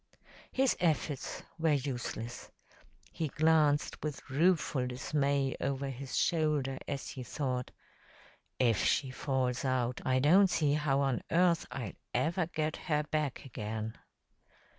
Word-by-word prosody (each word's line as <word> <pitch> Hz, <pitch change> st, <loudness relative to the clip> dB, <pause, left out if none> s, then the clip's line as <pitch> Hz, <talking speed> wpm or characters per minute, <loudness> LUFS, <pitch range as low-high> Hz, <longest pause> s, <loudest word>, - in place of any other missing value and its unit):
His 265 Hz, -1 st, +2 dB
efforts 155 Hz, -4 st, -1 dB, 0.2 s
were 160 Hz, -1 st, +3 dB
useless. 120 Hz, -4 st, -3 dB, 0.6 s
He 160 Hz, -, -2 dB
glanced 150 Hz, -1 st, +2 dB
with 150 Hz, -3 st, -5 dB
rueful 150 Hz, -4 st, +2 dB
dismay 140 Hz, +1 st, 0 dB
over 135 Hz, 0 st, -1 dB
his 130 Hz, +1 st, -5 dB
shoulder 150 Hz, -5 st, +1 dB
as 140 Hz, -, -4 dB
he 130 Hz, -, -6 dB
thought, 125 Hz, -1 st, -2 dB, 0.9 s
"If 115 Hz, -5 st, +3 dB
she 130 Hz, -2 st, +2 dB
falls 130 Hz, -2 st, -1 dB
out, 125 Hz, -2 st, 0 dB
I 130 Hz, 0 st, +2 dB
don't 175 Hz, +9 st, +6 dB
see 150 Hz, -5 st, +2 dB
how 145 Hz, -2 st, +2 dB
on 135 Hz, -3 st, +1 dB
earth 170 Hz, -1 st, +3 dB
I'll 125 Hz, -4 st, -5 dB, 0.2 s
ever 160 Hz, +7 st, +1 dB
get 155 Hz, -2 st, -2 dB
her 150 Hz, -3 st, 0 dB
back 150 Hz, -4 st, -1 dB
again." 110 Hz, -3 st, -4 dB
140 Hz, 125 wpm, -32 LUFS, 130-155 Hz, 0.9 s, don't